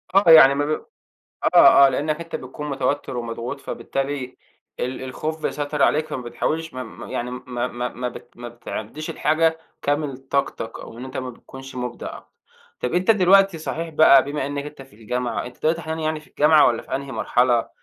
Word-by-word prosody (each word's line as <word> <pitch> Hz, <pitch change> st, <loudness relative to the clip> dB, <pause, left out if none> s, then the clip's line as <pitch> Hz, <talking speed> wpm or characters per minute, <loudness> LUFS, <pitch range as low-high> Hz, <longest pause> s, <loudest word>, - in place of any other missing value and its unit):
آه، 195 Hz, -4 st, +6 dB
يعني 140 Hz, -4 st, +9 dB
ما 145 Hz, +1 st, 0 dB
ب 155 Hz, +1 st, -2 dB, 0.7 s
آه، 140 Hz, -, +8 dB
آه -, -, +4 dB
لإنك 150 Hz, +4 st, -1 dB
أنت 165 Hz, 0 st, -5 dB
بتكون 145 Hz, +3 st, -7 dB
متوتِّر 135 Hz, -1 st, -2 dB
ومضغوط، 120 Hz, +3 st, -5 dB
فبالتالي 135 Hz, -2 st, -4 dB, 0.4 s
ال 130 Hz, +1 st, -3 dB
الخوف 155 Hz, +5 st, -5 dB
بيسيطر 145 Hz, 0 st, -2 dB
عليك، 155 Hz, +1 st, +3 dB
فما 130 Hz, -, -5 dB
بتحاولش 160 Hz, +6 st, -3 dB
ما 130 Hz, -, -4 dB
ما 110 Hz, -, -10 dB
يعني 120 Hz, +1 st, -3 dB
ما 125 Hz, -1 st, -4 dB
ما 120 Hz, 0 st, -3 dB
ما 125 Hz, +1 st, -4 dB
بت -, -, -12 dB
ما 120 Hz, 0 st, -7 dB
بتعديش 120 Hz, +4 st, -7 dB
الحاجة 160 Hz, +2 st, +1 dB, 0.2 s
كامل 145 Hz, -2 st, -1 dB
طاقتك، 135 Hz, -4 st, -3 dB
أو 115 Hz, -, -11 dB
إن 125 Hz, -, -6 dB
أنت 130 Hz, +1 st, -8 dB
ما 130 Hz, -1 st, -4 dB
بتكونش 135 Hz, +2 st, -12 dB
مبدع، 125 Hz, -1 st, -5 dB, 0.6 s
طب 125 Hz, -, -2 dB
أنت 185 Hz, +5 st, +2 dB
دلوقتي 195 Hz, -3 st, +5 dB
صحيح 165 Hz, +1 st, -4 dB
بقى 150 Hz, -4 st, +6 dB
بما 145 Hz, -1 st, -3 dB
إنك 145 Hz, 0 st, -4 dB
أنت 150 Hz, -2 st, -10 dB
في 130 Hz, -6 st, -19 dB
الجامعة، 125 Hz, +2 st, -3 dB
أنت 125 Hz, -, -13 dB
دلوقتي 160 Hz, +2 st, +1 dB
حاليًا 160 Hz, 0 st, -4 dB
يعني 155 Hz, 0 st, -1 dB
في -, -, -20 dB
الجامعة 150 Hz, 0 st, +5 dB
والّا 115 Hz, -, +1 dB
في -, -, -6 dB
أنهي 140 Hz, 0 st, -7 dB
مرحلة 120 Hz, -2 st, +2 dB
140 Hz, 190 wpm, -22 LUFS, 125-155 Hz, 0.7 s, يعني